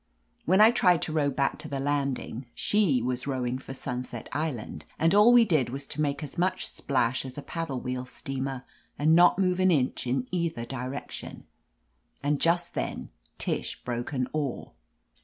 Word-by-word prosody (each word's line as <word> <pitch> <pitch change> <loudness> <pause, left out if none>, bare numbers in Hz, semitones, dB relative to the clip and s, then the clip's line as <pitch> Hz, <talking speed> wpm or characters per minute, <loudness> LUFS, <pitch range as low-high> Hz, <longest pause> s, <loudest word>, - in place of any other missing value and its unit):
When 190 +5 +5
I 220 +2 +9
tried 180 - +3
to - - -3
row 150 -2 +2
back 140 0 0
to - - -6
the 140 0 -3
landing, 135 -3 -2
she 175 - +2
was 125 +1 -2
rowing 130 -2 -1
for 135 - -8
Sunset 125 -1 -5
Island, 130 - -3
and 165 +2 +3
all 210 +4 +7
we 240 -1 +7
did 155 - +2
was 135 +3 -5
to 150 - -3
make 145 0 -1
as 150 +2 -7
much 185 +1 +1
splash 125 -3 0
as 130 0 -8
a 145 - -5
paddle 155 -4 -3
wheel 125 0 -4
steamer, 135 -1 -5 0.3
and 155 +2 +4
not 175 +1 +6
move 185 -1 +1
an 185 0 +4
inch 135 -6 +1
in 125 0 0
either 170 -9 -1
direction. 130 +2 -6 0.8
And 145 0 +1
just 170 +1 +2
then - - -3 0.3
Tish - - -3
broke 120 -1 -3
an 130 -3 -1
oar. 145 -5 -3
140 Hz, 175 wpm, -28 LUFS, 125-165 Hz, 0.8 s, I